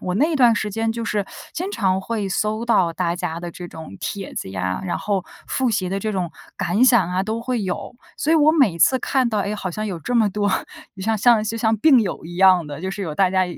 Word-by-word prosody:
我 180 - -2
那 305 - +2
段 245 -4 +5
时 210 -1 -2
间 225 +2 -1
就 230 0 -4
是 210 -3 -1 0.3
经 365 +4 -3
常 190 - +1
会 205 0 -3
搜 215 +3 -1
到 185 -8 +3
大 170 0 -1
家 170 -2 -4
的 175 0 -5
这 175 +1 -8
种 160 - -10
帖 195 -2 -5
子 95 - -5
呀， 95 -1 -3
然 180 - -2
后 195 -3 -1 0.2
复 260 -2 0
习 200 -4 -1
的 195 +2 -2
这 215 +2 -2
种 180 -3 -2 0.3
感 205 +8 +2
想 240 -8 +4
啊 185 +1 0
都 220 +3 -3
会 240 -2 -2
有。 185 +5 -4 0.2
所 305 - 0
以 325 - +5
我 310 0 +5
每 255 - +3
次 260 +10 +4
看 260 0 +1
到， 215 - 0
诶， 200 +1 -1
好 190 -3 -4
像 215 +5 -4
有 185 -5 -4
这 245 +10 -4
么 225 -3 +4
多， 205 +1 0 0.5
就 190 - -7
像 220 +2 +1
像 225 +1 +4
就 225 +1 -3
像 225 -1 +1
病 265 +3 +5
友 200 -7 -3
一 170 +2 -8
样 185 -3 +5
的， 145 0 -7
就 190 +2 -3
是 200 - -6
有 160 -5 -4
大 190 +2 +3
家 185 0 +2
205 Hz, 275 characters per minute, -21 LUFS, 180-230 Hz, 0.5 s, 段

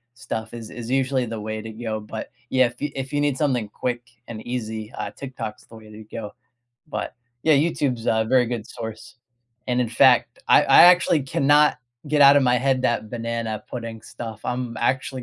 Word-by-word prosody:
stuff 115 -3 -5
is 115 -2 -8
is 120 0 -7
usually 130 -1 +1
the 115 -2 -5
way 110 0 -4
to 110 +1 -8
go, 110 -1 -4
but, 105 +1 -7 0.2
yeah, 130 -1 +4
if 120 - -10
y 145 - -3
if 135 0 -5
you 145 - 0
need 145 -2 +1
something 125 -7 0
quick 120 +3 -3 0.3
and 110 -2 -8
easy, 110 -3 -4
uh, - - -4
Tiktok's 120 -2 -7
the 115 - -15
way 110 -1 -13
to 110 +1 -11
go, 105 0 -7 0.6
but - - -4 0.3
yeah, 155 - +5
YouTube's 140 -5 0
a 110 0 +2
very 130 -1 +4
good 115 -2 -4
source, 110 0 -8 0.5
and, 125 0 +1
in 120 - 0
fact, 115 - +4
I - - +7
I - - +7
actually 175 -3 +5
cannot 145 +3 +3 0.3
get 150 0 +4
out 140 0 +8
of 140 - +5
my 125 0 +3
head 130 0 +1
that 120 -3 0
banana 115 -2 -3
pudding 115 -2 -6
stuff, 115 -2 -8
I'm 120 -2 -3
actually 130 +2 -1
120 Hz, 195 wpm, -23 LUFS, 110-135 Hz, 0.6 s, out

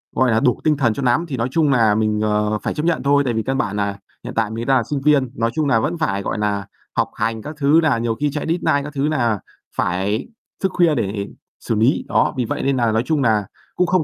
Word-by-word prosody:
gọi 130 -2 +3
là 110 - +3
đủ 125 0 +2
tinh 155 -2 +2
thần 120 -5 +2
cho 140 - -5
nắm. 125 +7 +2
Thì 135 -5 -4
nói 115 +1 0
chung 155 0 +2
nà 115 -5 +4
mình, 110 -1 +1
ờ, 105 0 +1
phải - - -1
chấp 150 +2 -3
nhận 170 -1 +1
thôi, 140 +1 +3
tại 120 - 0
vì 110 0 -1
căn 135 +3 -1
bản 105 -6 -1
nà 100 -1 -1 0.3
hiện - - -6
tại 115 -2 +1
mình 115 +1 -4
đang 130 -2 +3
sinh 140 +3 -3
viên. 140 -3 +3
Nói 115 0 0
chung 155 -2 0
nà 115 -5 +3
vẫn 155 +8 -1
phải, 100 -11 -1
gọi 100 - -3
nà, 100 -1 -1 0.3
học - - +1
hành 115 -1 -1
các 150 +7 -7
thứ, 145 +3 +4
nà 145 -6 +3
nhiều 115 0 -1
khi 150 -1 0
chạy 150 +1 -3
deadline 160 -4 +1
các 145 0 -7
thứ 140 0 0
nà 120 -9 +1 0.4
phải 100 +6 -1 0.4
thức 190 - +2
khuya 170 -4 +4
để 100 -2 -2 0.3
xử 115 - -2
lý. 115 +7 +2
Đó, - - +2
vì 125 - 0
vậy - - -3
nên 135 -1 +1
nà 120 -2 +2
nói 110 +1 +1
chung 155 -1 +1
nà 110 -5 +2 0.3
cũng 180 - +2
không 185 -1 +2
125 Hz, 270 wpm, -20 LUFS, 110-145 Hz, 0.4 s, nà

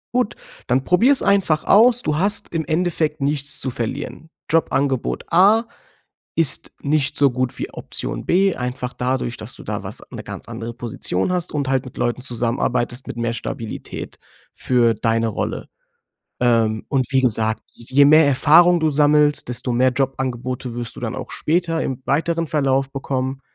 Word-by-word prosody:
Gut, 250 -4 +1 0.3
dann 130 +2 +1
probier's 245 - +3
einfach 185 -6 +2
aus. 235 +4 +5
Du 150 -1 0
hast 200 +1 0
im 160 -2 -1
Endeffekt 160 -2 -1
nichts 140 0 -2
zu 130 - -3
verlieren. 135 +7 -5 0.2
Jobangebot 140 -5 0
A 205 +6 +5 0.7
ist 165 -4 +3
nicht 145 -1 0
so 140 -2 +4
gut 130 0 -2
wie - - -4
Option - - -3
B. 190 +1 +2
Einfach 125 0 -4
dadurch, 125 -1 -2
dass - - -9
du - - -10
da - - -4
was - - -8
'ne - - -7
ganz - - -9
andere 115 +1 -6
Position 115 - -2
hast 180 -1 -1
und 145 -2 -1
halt 135 -1 0
mit 125 - -11
Leuten 120 +1 -1
zusammenarbeitest 120 0 -1
mit - - -6
mehr 115 0 -1
Stabilität 115 -1 -7 0.3
für 120 -2 +2
deine 115 +1 0
Rolle. 110 - -4 0.7
Ähm, 115 -3 +2
und 130 -3 +1
wie 130 -1 +3
gesagt, 110 -2 +1
je 130 +4 +2
mehr 155 +1 +6
Erfahrung 160 +6 +5
du 160 -1 +2
sammelst, 150 0 +3
desto 125 +1 -2
mehr 130 +2 +3
Jobangebote 130 -2 -3
wirst 120 -2 -4
du - - -8
dann - - -4
auch - - -7
später 165 0 0
im 130 -1 -4
weiteren 165 +4 0
Verlauf 135 -3 0
bekommen, 135 -1 -3
135 Hz, 165 wpm, -20 LUFS, 125-160 Hz, 0.7 s, mehr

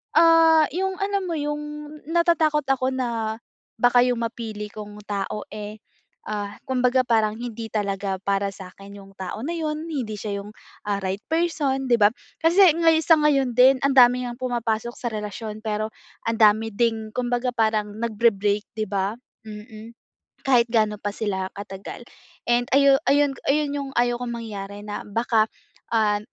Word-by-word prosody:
ah, 325 -1 +6
yung 380 +3 -1
alam 400 -1 -1
mo 335 - -2
yung 295 0 -2 0.5
natatakot 325 -3 +2
ako 260 -1 +1
na, 230 -4 -2 0.4
baka 245 +2 +4
yung 240 -2 0
mapili 220 -3 -5
kong 210 -1 -9
tao, 205 0 -3
eh, 210 0 -7 0.5
ah, 205 -1 -3
kumbaga 255 0 +2
parang 220 -3 +1
hindi 230 -1 -6
talaga 200 -2 -2
para 200 0 0
sa'kin 195 +1 -12
yung 195 0 -14
tao 190 +3 -5
na 320 - -3
'yon, 310 0 -3
hindi 240 -8 -3
siya 205 -1 -4
yung, 210 +1 -12 0.3
ah, 205 - +1
right 190 +1 -2
person, 310 -5 0
'di 240 - +5
ba? 205 - +7 0.3
Kasi 345 +2 +6
ngayon, 325 -1 +4
sa 325 +1 +6
ngayon 275 -4 +2
din 260 +2 +7
ang 275 - +3
dami 250 0 +6
ngang 245 0 -6
pumapasok 235 -2 -2
sa 240 - -4
relasyon 215 0 -5
pero 215 0 -1 0.4
ang 230 - -1
dami 220 +1 +4
ding 220 0 -1
kumbaga 245 +1 -1
parang 220 -3 0
nagbre-break 210 -3 +1
'di 215 - 0
ba, 200 +2 -2 0.3
mm. 215 +1 -10 0.5
Kahit 245 -3 +4
ga'no 215 -2 +2
pa 205 - -3
sila 190 -4 -2
katagal 200 +3 -8 0.5
and 240 0 +3
ayu 275 0 +6
ayun 285 0 +4 0.2
ayun, 295 +1 +2
yung 275 -1 -4
ayaw 240 0 +2
kong 240 -1 -3
mangyari 205 -3 -7
na 205 0 -5
baka, 220 +1 +1 0.5
ah, 215 -2 +2
230 Hz, 160 wpm, -24 LUFS, 210-270 Hz, 0.5 s, ba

